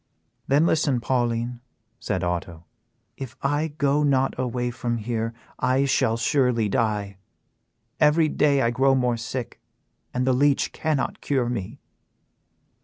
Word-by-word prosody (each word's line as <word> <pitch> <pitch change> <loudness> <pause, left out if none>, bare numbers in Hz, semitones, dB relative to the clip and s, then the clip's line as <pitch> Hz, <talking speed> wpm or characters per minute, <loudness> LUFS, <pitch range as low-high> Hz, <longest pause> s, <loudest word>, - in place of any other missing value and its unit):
"Then 145 +4 +4
listen, 145 -6 +2
Pauline," 120 0 -1 0.4
said 95 -4 -2
Otto; 85 -1 -3 0.5
"if 130 -1 -7
I 145 +3 +1
go 145 -1 +1
not 135 -2 +2
away 125 -1 -2
from 120 0 -2
here 115 0 -2 0.3
I 130 +2 +2
shall 130 -4 +2
surely 125 -2 +2
die. 105 -2 -1 0.8
Every 155 +1 +4
day 145 -2 +2
I 115 - +2
grow 135 +2 +3
more 125 -2 +1
sick 120 +1 -6 0.5
and 125 0 -1
the 130 - +3
leech 140 +2 +2
cannot 155 -3 -1
cure 130 -4 0
me." 115 +2 -5
125 Hz, 130 wpm, -24 LUFS, 115-140 Hz, 0.8 s, Then